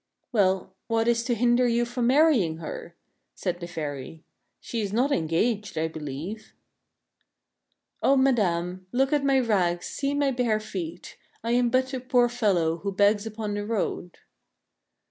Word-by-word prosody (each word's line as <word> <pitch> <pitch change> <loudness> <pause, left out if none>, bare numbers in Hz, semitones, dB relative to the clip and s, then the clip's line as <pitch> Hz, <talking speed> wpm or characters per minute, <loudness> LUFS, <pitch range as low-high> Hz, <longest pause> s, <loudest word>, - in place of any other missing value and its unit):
" - - -53
"Well, 190 -4 +1
what 225 0 +1
is 235 -1 +2
to 240 -1 +1
hinder 240 +2 +3
you 240 0 +2
from 240 0 -1
marrying 255 - +4
her?" 170 +1 -7 0.4
said 175 -2 -3
the 170 - -6
fairy. 155 -2 -6 0.2
" - - -51
She 230 - -4
is 200 -2 -3
not 250 +7 +1
engaged, 200 - 0
I 160 +1 +1
believe." 160 +7 -7 0.8
" - - -52
O 275 - +4
madame, 185 -8 +1
look 270 +3 +1
at 290 -1 +2
my 275 -1 +4
rags, 185 -8 +1
see 280 0 -2
my 285 -1 +2
bare 240 -4 +1
feet. 180 -5 -7 0.3
I 230 - -1
am 245 0 +3
but 260 +2 +1
a 260 - -1
poor 245 -1 +2
fellow 190 -9 +1
who 200 +4 -3
begs 205 +2 +2
upon 215 -1 -4
the 205 0 -2
road." 205 -5 -3
215 Hz, 165 wpm, -26 LUFS, 175-245 Hz, 0.8 s, marrying